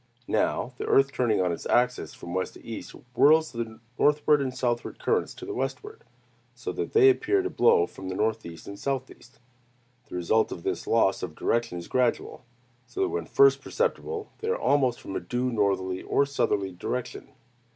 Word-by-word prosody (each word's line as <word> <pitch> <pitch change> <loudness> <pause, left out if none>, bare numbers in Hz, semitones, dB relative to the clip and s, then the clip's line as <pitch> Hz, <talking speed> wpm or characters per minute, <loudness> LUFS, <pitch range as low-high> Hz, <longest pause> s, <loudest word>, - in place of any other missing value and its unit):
Now, 115 +3 0
the - - -3
earth 135 0 +4
turning 120 -6 +1
on 90 -1 +1
its 85 - -5
axis 125 +1 +1
from 85 - -8
west 95 0 -2
to - - -15
east, 115 - -7 0.2
whirls 155 +5 +5
the 115 -2 -5 0.2
northward 150 0 +4
and 130 -2 -1
southward 120 -2 -2
currents 450 0 0
to 370 - -9
the 400 - -5
westward, 420 +3 -5 0.5
so - - -5
that - - -4
they 405 -2 +7
appear 380 +1 +1
to 380 - -3
blow 460 -2 +4
from 95 - -9
the 95 - -4
northeast 105 -6 -2
and 100 0 -8
southeast. 130 -2 -5 0.7
The - - -7
result 90 +6 +1
of 85 - -7
this - - -3
loss 105 -4 +2
of 80 -4 -5
direction 115 -6 -1
is 85 - -7
gradual; 125 -2 0 0.4
so 390 - -5
that 380 - +2
when 425 +3 -3
first 415 0 +5
perceptible, 460 -2 -2
they 440 - -5
are 465 +2 +1
almost 130 - +2
from 95 - -7
a - - 0
due 125 +1 -2
northerly 95 -4 0
or 140 - +2
southerly 100 -8 0
direction. 120 +7 -5
125 Hz, 185 wpm, -27 LUFS, -, 0.7 s, they